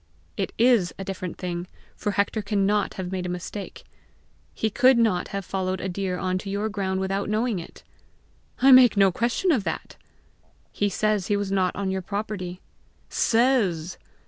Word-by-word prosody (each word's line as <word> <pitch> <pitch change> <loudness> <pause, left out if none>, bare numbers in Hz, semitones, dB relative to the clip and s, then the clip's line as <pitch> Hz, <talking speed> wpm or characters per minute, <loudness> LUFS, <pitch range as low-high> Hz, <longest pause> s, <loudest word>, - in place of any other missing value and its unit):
"It - - -2
is 230 -6 +3
a 195 - -5
different 185 -2 -5
thing, 175 -1 -4 0.3
for 205 -1 -2
Hector 200 +3 0
cannot 205 0 0
have 185 -1 -5
made 185 -1 -3
a - - -4
mistake. 180 +3 -6 0.7
He 220 - -1
could 255 +3 +5
not 215 -6 +2
have 195 -1 -5
followed 185 -1 -2
a 190 - -3
deer 185 0 -2
on 185 0 -1
to 200 - -7
your 205 +2 -1
ground 190 -2 -2
without 195 +1 -2
knowing 215 -1 0
it!" 165 - -11 0.8
"I 270 - +8
make 255 -4 +8
no 195 -1 +5
question 240 - 0
of 250 -10 +2
that!" - - -5 0.7
"He 205 - 0
says 210 -1 0
he 205 - +1
was 200 -1 -3
not 185 -2 +1
on 195 -1 -2
your 190 0 -2
property." 190 -2 -5 0.5
"Says!" 225 -9 +1
195 Hz, 170 wpm, -25 LUFS, 185-215 Hz, 0.8 s, I